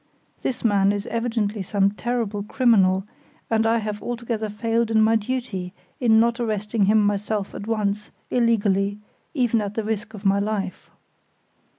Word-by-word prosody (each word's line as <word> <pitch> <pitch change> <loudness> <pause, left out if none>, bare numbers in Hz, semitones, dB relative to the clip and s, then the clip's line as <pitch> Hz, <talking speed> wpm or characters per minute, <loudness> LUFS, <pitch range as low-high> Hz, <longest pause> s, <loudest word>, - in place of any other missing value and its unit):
This 255 - -3
man 200 -2 +4
is 205 0 -3
evidently 225 -3 -1
some 195 +1 +1
terrible 220 -2 -2
criminal, 200 -5 +3 0.5
and 225 0 +3
I 230 +1 +3
have 210 -2 -4
altogether 235 -2 -3
failed 225 +2 0
in 220 -1 +3
my 220 +1 +4
duty 215 -5 -3 0.2
in 225 -3 +5
not 235 +1 +2
arresting 215 -2 0
him 210 +1 +4
myself 205 0 -1
at 205 - -7
once, 210 -2 -1 0.2
illegally, 205 -4 +2 0.4
even 240 -4 +2
at 205 0 -4
the 225 - -1
risk 215 0 -3
of 205 0 -11
my 195 +1 +4
life." 200 -2 -3
215 Hz, 155 wpm, -23 LUFS, 200-230 Hz, 0.5 s, in